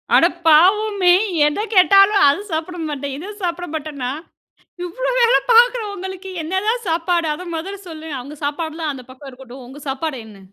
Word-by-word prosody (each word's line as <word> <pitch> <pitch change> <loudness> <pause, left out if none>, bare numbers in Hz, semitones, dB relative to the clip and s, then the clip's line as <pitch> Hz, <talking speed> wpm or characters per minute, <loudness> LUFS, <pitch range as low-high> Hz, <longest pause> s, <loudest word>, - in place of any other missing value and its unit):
அட - - +6 0.2
பாவமே! 380 +4 +4 0.4
எத 300 +7 -2
கேட்டாலும் 395 +2 +6
இத 290 +9 +3
சாப்பிட 325 +3 -3
மாட்டேன்னா, 285 +4 -5
அத 420 - -10
சாப்பிட 350 0 -3
மாட்டேன். 300 -3 -6 0.9
இவ்ளோ - - -3
வேல 470 +1 +5 0.2
பார்க்குற 480 0 +5
உங்களுக்கு 380 0 -7
என்ன 320 +4 -5
தான் 470 0 0
சாப்பாடு 335 +1 0
அத 355 - -8
முதல்ல 390 +4 -6
சொல்லுங்க. 315 -2 -8
அவுங்க 285 +4 -10
சாப்பாடுலாம் 315 +1 -3
அந்த 260 -2 -10
பக்கம் 270 +2 -12
இருக்கட்டும். 255 0 -12
உங்க 270 +4 -12
சாப்பாடு 270 +1 -3
என்ன? 210 -2 -14
330 Hz, 160 wpm, -19 LUFS, 290-390 Hz, 0.9 s, அட